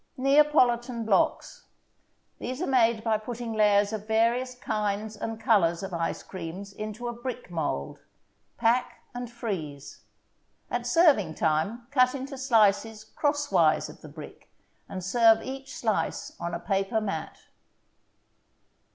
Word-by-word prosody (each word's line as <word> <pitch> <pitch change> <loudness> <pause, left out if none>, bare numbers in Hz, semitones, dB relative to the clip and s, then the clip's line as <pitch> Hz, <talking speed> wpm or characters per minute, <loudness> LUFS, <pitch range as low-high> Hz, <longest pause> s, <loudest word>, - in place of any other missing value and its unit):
NEAPOLITAN 255 -4 +3
BLOCKS 205 -3 0 0.7
These 255 +2 -5
are - - 0
made 235 -5 +2
by 220 -2 +1
putting 235 +1 -5
layers 205 -1 +3
of 215 -1 -5
various 235 +3 +1
kinds 215 -2 -2
and 225 +1 -5
colors 195 -6 +2
of 190 -1 -6
ice 165 -1 -2
creams 185 +2 -7
into 215 +3 -6
a 240 - -3
brick 245 -4 -6
mold. 145 - -3 0.6
Pack 235 +2 +1
and 245 -1 -6
freeze. 160 - -6 0.7
At 240 0 -2
serving 245 - +4
time, 165 +11 0
cut 255 -1 +3
into 275 +1 -6
slices 225 -4 +2
crosswise 210 - +1
of - - -13
the - - -11
brick, - - -12 0.4
and 185 -1 -6
serve 225 +3 +4
each 270 +1 -7
slice 220 -3 -2
on 170 0 -3
a - - -4
paper 195 +4 0
mat. 195 -7 -4
220 Hz, 130 wpm, -27 LUFS, 195-245 Hz, 0.7 s, serving